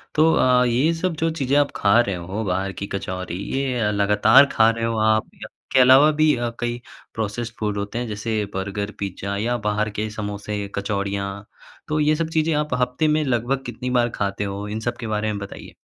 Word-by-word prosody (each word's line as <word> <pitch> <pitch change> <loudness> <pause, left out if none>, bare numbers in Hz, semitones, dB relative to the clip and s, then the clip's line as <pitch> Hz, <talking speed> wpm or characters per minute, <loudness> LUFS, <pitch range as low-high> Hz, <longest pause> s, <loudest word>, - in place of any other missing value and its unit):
तो 160 +1 +5
अ, 125 0 +4
ये 125 +7 +2
सब 170 +2 -1
जो 165 - +2
चीज़ें 135 0 +1
आप 145 -1 +2
खा 100 +3 +4
रहे 100 -5 +1
हो, 95 +5 -4
बाहर 95 +1 -1
की 100 - -3
कचौड़ी, 95 -2 -4 0.2
ये 135 -2 -1
अ, 105 -2 +1
लगातार 105 +6 +5
खा 110 0 +5
रहे 115 0 -1
हो 115 -1 -1
आप 110 0 0
या - - -6 0.3
के 130 - +5
अलावा 130 +4 +7
भी 155 -1 +5
अ, 120 -1 -2
कई 120 0 -3 0.3
प्रोसेस्ड 115 +1 -3
फूड 105 -1 -1
होते 100 +2 -4
हैं, 120 - -3
जैसे 105 0 -2
बर्गर, 100 +2 -3
पिज़्ज़ा 100 0 -4
या 120 +4 0
बाहर 105 +1 0
के 110 0 -1
समोसे, 105 -1 -4
कचौड़ियाँ। 100 0 -3 0.4
तो 155 -1 0
ये 150 +1 +3
सब 160 +1 -2
चीज़ें 160 0 +2
आप 150 -2 -1
हफ़्ते 125 +5 0
में 155 0 +2
लगभग 130 0 -1
कितनी 125 - -5
बार 120 0 +2
खाते 100 0 -2
हो? 100 +1 -4
इन 105 +1 -4
सब 120 +2 -3
के 115 - -6
बारे 110 0 -1
में 100 - -4
बताइए। 100 0 -9
110 Hz, 210 wpm, -22 LUFS, 100-125 Hz, 0.4 s, अलावा